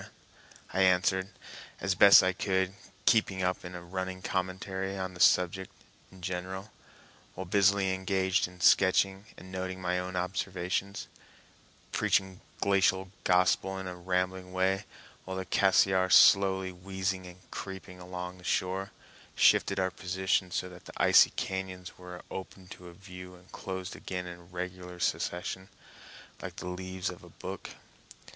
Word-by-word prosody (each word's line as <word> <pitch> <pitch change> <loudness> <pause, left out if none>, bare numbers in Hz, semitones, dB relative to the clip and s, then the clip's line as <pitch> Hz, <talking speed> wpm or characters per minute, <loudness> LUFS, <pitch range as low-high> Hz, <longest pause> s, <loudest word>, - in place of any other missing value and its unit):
I 95 - +1
answered 95 +1 +3 0.5
as 95 0 0
best 100 +2 +8
I 95 0 +2
could, 95 0 0 0.3
keeping 100 -5 +3
up 90 0 -1
a 90 - -6
running 95 +1 -5
commentary 95 +1 -3
on 95 -1 -4
the 90 - -12
subject 90 +1 +3 0.4
in 95 -1 -16
general, 95 +3 -4 0.6
while 95 - -5
busily 100 0 +3
engaged 95 -1 +1
in 90 0 -15
sketching 95 +2 +4
and 95 +1 -12
noting 95 0 -4
my 90 0 -1
own 90 0 -5
observations, 90 +1 -2 0.9
preaching 95 -1 +1 0.2
glacial 95 -1 +2
gospel 90 +1 +3
in 95 - -5
a 90 -1 -5
rambling 90 +1 -2
way, 95 +2 +1 0.4
while 95 0 -5
the 95 - -3
Cassiar, 95 0 +3
slowly 95 -1 +6
wheezing 95 +1 -3
and 90 0 -12
creeping 95 -1 -7
along 90 0 -7
the - - -16
shore, 95 +2 -1 0.5
shifted - - +4
our 95 0 +1
position 95 0 -1
so 90 - -2
that 90 -1 -13
the - - -11
icy - - +6
cañons 95 -1 -4
were 90 -1 -9
opened 95 -1 -8
to 90 -1 -10
view 90 0 -11
and 90 +1 -19
closed 95 -1 -6
again 90 -1 -5
in 85 -1 -10
regular 90 0 -6
succession, 90 +2 -2 0.7
like - - -7
the - - -7
leaves 95 0 -4
of 90 - -12
a - - -13
book. - - -7
95 Hz, 140 wpm, -30 LUFS, 90-95 Hz, 0.9 s, best